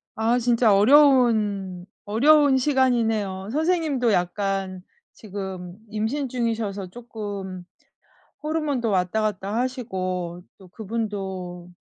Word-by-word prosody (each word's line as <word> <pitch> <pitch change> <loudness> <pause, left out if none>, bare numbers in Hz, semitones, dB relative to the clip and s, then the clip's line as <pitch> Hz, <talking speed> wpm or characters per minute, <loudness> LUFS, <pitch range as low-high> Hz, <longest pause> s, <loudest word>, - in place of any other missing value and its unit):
아 230 +2 +2
진짜 235 -2 +3
어려운 215 -7 +4 0.2
어려운 280 +5 +5
시간이네요. 225 -8 +1
선생님도 310 -6 +1
약간 190 0 -1 0.3
지금 190 -3 -7
임신 230 +6 -2
중이셔서 220 -6 -2
쪼끔 200 -5 -7 0.8
호르몬도 295 -7 -1
왔다 185 +3 +1
갔다 205 -1 -2
하시고 185 -9 -3 0.2
또 190 -2 -15
그분도 190 -4 -5
215 Hz, 230 characters per minute, -24 LUFS, 190-245 Hz, 0.8 s, 어려운